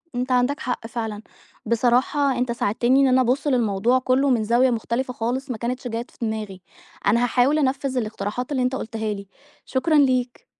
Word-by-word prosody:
أنت 250 +1 -2
عندك 250 +3 +2
حق 245 -3 -4
فعلًا، 220 -3 -4 0.4
بصراحة 250 +4 +2
أنت 245 -1 0
ساعدتني 240 +3 +1
إن 275 - +4
أنا 260 0 +4
أبُصّ 255 +4 0
للموضوع 240 -1 +2
كُلّه 260 +2 +2
من 240 -4 +2
زاوية 240 +4 +3
مختلفة 240 +2 -2
خالص، 250 +4 -3
ما 235 - -3
كانتش 245 +2 -3
جات 235 +1 -5
في - - -24
دماغي 215 -4 -4 0.5
أنا 235 +2 +3
هاحاول 255 +5 +2
أنفِّذ 270 -1 0
الاقتراحات 215 +2 -3
اللي 260 -3 0
أنت 255 +1 0
قُلتها 220 -3 -3
لي، 200 -1 -8 0.4
شكرًا 310 +5 0
ليك. 255 -4 +2
245 Hz, 175 wpm, -23 LUFS, 225-260 Hz, 0.5 s, إن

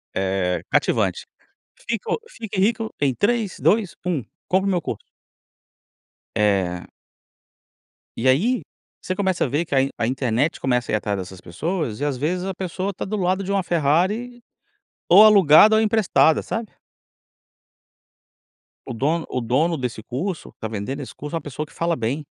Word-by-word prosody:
é 95 -2 -1
cativante, - - +1 0.6
fico 230 - -2
fique 220 - -6
rico 225 +2 +1
em 140 -2 +2
3, 215 - 0
2, 205 -7 +2
1 165 -9 -1 0.2
compra 190 +1 +2
o 195 - +2
meu 180 - +1
curso. - - -5 1.4
Eh. 95 -4 +1 1.3
E 130 +3 +2
aí, 225 - +2 0.4
você 185 - -2
começa 190 -2 0
a - - +1
ver 150 +7 -1
que 145 - -3
a 135 - +5
in 135 - 0
a 115 - 0
internet 130 +3 0
começa 125 -2 0
a - - -1
ir - - +4
atrás 105 -1 -1
dessas 95 0 -8
pessoas, 140 - -3
e 145 - -1
às 145 -2 -1
vezes 175 +7 -1
a 195 - -3
pessoa 185 +2 -4
tá - - -5
do 215 +2 -3
lado 185 0 0
de 195 - -3
uma 200 -1 +2
Ferrari 180 - 0 0.7
ou 195 +5 +9
alugada 205 0 +7
ou 220 - +4
emprestada, 210 -7 +3
sabe? 225 -2 -4 2.2
O - - -4
dono 155 +8 0
o 125 - -2
dono 145 +9 +1
desse 125 -4 -4
curso 165 - -4
tá 110 - -3
vendendo 110 +7 -4
esse 135 - -8
curso 150 +3 -6
a - - +1
uma - - -5
pessoa 145 +1 -5
que - - -20
fala 170 0 0
bem. 135 +4 -3
160 Hz, 170 wpm, -22 LUFS, 125-195 Hz, 2.2 s, ou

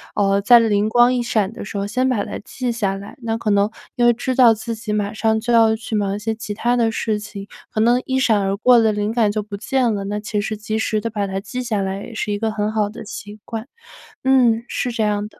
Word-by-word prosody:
嗯 200 -1 +2
在 240 +4 +7
灵 210 -2 +2
光 240 +2 +4
一 250 - 0
闪 215 -4 0
的 225 - -8
时 200 - -6
候 200 - -1
先 255 +6 0
把 240 -6 0
它 - - -6
记 250 +3 -4
下 205 -5 -1
来。 200 +1 -10
那 225 -1 -2
可 225 -2 -2
能 200 +1 +3 0.3
因 240 - +2
为 240 - +6
知 250 +2 -2
道 245 -3 +6
自 225 +2 -5
己 220 -1 -4
马 205 0 -1
上 220 0 +1
就 240 +1 -2
要 225 -1 +5
去 220 0 -8
忙 200 -2 0
一 - - -5
些 220 +1 -2
其 220 -1 -6
他 240 +4 0
的 230 -1 +2
事 220 -1 -1
情， 205 -1 -8 0.3
可 215 - 0
能 240 +3 +3
一 260 - -1
闪 230 -5 +3
而 195 0 0
过 240 +4 +5
的 220 -1 +3
灵 210 +1 -1
感 230 -3 +2
就 210 +1 -2
不 205 -1 -7
见 250 +2 0
了， 200 -1 -3
那 205 +1 -3
其 210 0 -2
实 215 +1 -2
及 215 +1 -3
时 215 -1 0
地 230 - -2
把 205 -2 -2
它 195 0 -3
记 250 +5 -5
下 220 -5 -1
来 195 +1 -3
也 235 - -9
是 210 -1 -3
一 205 - -2
个 225 0 0
很 215 0 -2
好 215 -2 +1
的 220 +2 -9
习 210 -1 -9
惯。 225 +1 -6 0.6
嗯， 245 -4 +3
是 245 - -2
这 230 -1 -2
样 210 0 0
的。 - - -21
220 Hz, 290 characters per minute, -20 LUFS, 205-235 Hz, 0.6 s, 在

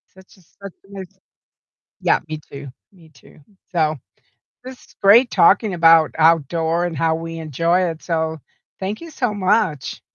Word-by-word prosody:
Such 190 +1 -19
a - - -22
such 195 +3 -13
a - - -22
nice 190 -3 -11 0.8
yeah, - - +2
me 155 -1 -6
too, 140 0 -9 0.2
me 165 -4 -20
too. 140 +1 -21 0.3
So, 155 -3 0 0.7
this 260 0 -10
is - - -22
great 230 +5 +6
talking 195 +3 +3
about 165 -2 +4
outdoor 165 +1 +1
and 170 -2 -4
how 160 +1 +1
we 165 0 -7
enjoy 165 +4 0
it, 160 -1 -8
so 160 -2 -2 0.4
thank 200 +6 -5
you 335 -1 -10
so 245 -6 -2
much. 190 - -1
170 Hz, 160 wpm, -19 LUFS, 160-195 Hz, 0.8 s, great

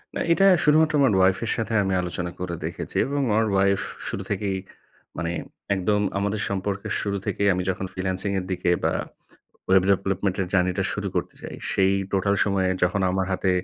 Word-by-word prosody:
না - - -1
এটা 195 +3 +3 0.2
শুধুমাত্র 155 +1 +4
আমার 130 -6 +4
ওয়াইফ 95 0 +4
এর - - 0
সাথে 115 0 -2
আমি 95 -1 0
আলোচনা 90 0 -4
করে 90 -1 -3
দেখেছি, - - -6
এবং 140 +1 -1
আমার 110 +2 +3
ওয়াইফ 100 0 +3 0.3
শুরু 100 - -3
থেকেই 100 -1 -1 0.6
মানে, 85 -1 -2 0.4
একদম 105 +2 +1 0.2
আমাদের 100 +1 -1
সম্পর্কের 100 0 -3
শুরু 100 -1 -1
থেকেই 100 - 0
আমি 90 0 -1
যখন 95 +1 -2
freelancing 95 +1 -2
এর 90 - -6
দিকে 90 -1 0
বা - - +2 0.8
web 95 -1 +6
development 95 0 +1
এর 95 - 0
journey 90 -1 +2
টা - - +2
শুরু - - -3
করতে - - -2
চাই, - - -7 0.2
সেই 95 0 +3 0.2
total 100 +1 +2
সময়ে 95 -2 +1
যখন 90 +3 +2
আমার 95 0 0
হাতে 95 0 +1
95 Hz, 185 wpm, -24 LUFS, 95-100 Hz, 0.8 s, web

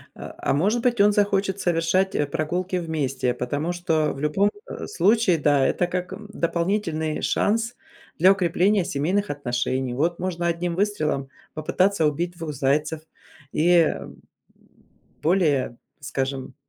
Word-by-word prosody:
А - - -9
а, - - 0
может 205 +11 +1
быть, 240 -3 +1
он 205 - +6
захочет 200 -1 +1
совершать, 175 +3 +1
э, 145 - +2
прогулки 170 +5 -2
вместе, 135 -7 -1
потому 145 +8 -2
что 160 -3 0
в 135 - -9
любом, 170 +8 +2 0.2
э, - - -6
случае, 220 - +3
да, 145 -2 +3
это 175 - +1
как, 180 0 -3
эм, 210 -1 -9
дополнительный 170 -3 -1
шанс 230 +3 0 0.4
для 185 +4 +6
укрепления 190 +1 +2
семейных 185 +9 -1
отношений. 130 -2 -2
Вот 165 +6 0
можно 175 -1 -2
одним 170 0 -1
выстрелом 155 -9 -1 0.2
попытаться 180 +3 +1
убить 170 +4 -1
2 160 -2 -5
зайцев 150 +3 0 0.5
и, 160 +3 +1
эм, 170 -3 +1 1.0
более, 150 -8 +1 0.2
скажем, 135 -1 -4
170 Hz, 135 wpm, -24 LUFS, 145-190 Hz, 1.0 s, он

